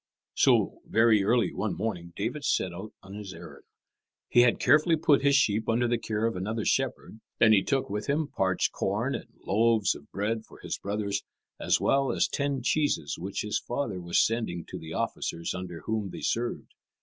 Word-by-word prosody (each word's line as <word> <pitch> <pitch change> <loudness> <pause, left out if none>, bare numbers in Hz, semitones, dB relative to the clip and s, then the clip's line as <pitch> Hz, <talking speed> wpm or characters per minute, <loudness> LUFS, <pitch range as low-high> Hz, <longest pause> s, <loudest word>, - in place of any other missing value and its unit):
So, - - +3
very 110 -2 +4
early 115 +3 +2
one 100 0 -2
morning, 90 -6 -3
David 120 +9 -3
set 95 -9 0
out 95 +5 -8
on 95 +1 -11
his 100 -2 -7
errand. - - -12 0.6
He - - +4
had 120 -1 +3
carefully 155 +2 +4
put 155 -3 +3
his 140 0 +4
sheep 110 -1 +2
under 120 +2 +2
the 120 0 0
care 110 0 -2
of 115 - 0
another 110 +4 -3
shepherd, 135 -4 -1 0.2
and 110 -1 +6
he 100 - +5
took 135 +4 0
with 105 +1 -4
him 150 +2 +1
parched 95 -8 0
corn - - -1
and - - -5 0.2
loaves 110 0 +3
of 70 - -13
bread 110 +3 -2
for - - -15
his - - -4
brothers, 100 0 -2 0.4
as - - +2
well 135 0 +2
as - - +2
ten 140 -3 -2
cheeses 145 - 0
which 95 +3 -3
his 105 - -1
father 120 -8 -3
was 85 0 -1
sending 110 -7 -2
to - - -6
the 80 0 -9
officers 85 0 -3
under 90 -2 -6
whom 110 -3 -2
they - - -8
served. 120 +1 -2
110 Hz, 190 wpm, -28 LUFS, 95-120 Hz, 0.6 s, and